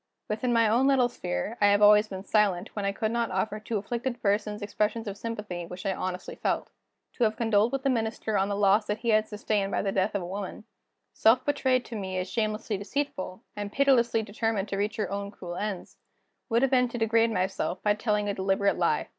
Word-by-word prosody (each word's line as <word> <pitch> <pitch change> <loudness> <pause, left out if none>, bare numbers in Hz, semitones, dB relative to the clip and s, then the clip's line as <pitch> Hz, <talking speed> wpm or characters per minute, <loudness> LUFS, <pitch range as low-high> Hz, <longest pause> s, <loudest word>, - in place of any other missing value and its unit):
Within 220 +4 -1
my 230 -1 +4
own 240 +5 +3
little 260 -3 +4
sphere, 90 - -4
I 205 - +6
have 205 0 +4
always 210 +1 +7
been 190 -2 -7
silent, 200 -4 +1
when 205 -2 -2
I 200 - +1
could 220 +2 -2
not 235 -1 0
offer 205 +3 -1
to 215 +1 -3
afflicted 240 +4 -3
persons 210 +1 0
expressions 210 +2 -1
of 200 - -4
sympathy 210 -5 -5
which 180 +2 -9
I 195 - +1
honestly 185 -1 -4
felt. - - -2 0.5
To 245 - +2
have 220 -1 +2
condoled 225 0 +2
with 275 -1 -2
the 275 - +2
Minister 220 -2 -1
on 195 0 +2
the 200 - -1
loss 205 +1 +3
that 210 - -1
he 235 - -1
had 215 0 +3
sustained 210 -1 -1
by - - 0
the 195 - 0
death 195 +2 0
of 195 - -1
a - - -5
woman, 195 +3 -6 0.5
self 235 +4 +4
betrayed 260 -3 +1
to 230 - -7
me 190 -3 -4
as 185 0 -2
shamelessly 215 -1 -1
deceitful, 210 -4 -4
and 205 -1 -5
pitilessly 240 -4 +3
determined 215 -1 -2
to 195 - -2
reach 205 +1 -1
her 210 -4 -2
own 200 0 -3
cruel 180 -4 -8
ends, 200 -2 -5 0.5
would 235 +2 +2
have 270 - +2
been 250 -1 +4
to 240 - -5
degrade 225 0 +3
myself 185 -3 -1
by 210 - +4
telling 210 -1 0
a 200 - 0
deliberate 195 +1 +1
lie. - - +1
210 Hz, 220 wpm, -27 LUFS, 200-230 Hz, 0.5 s, always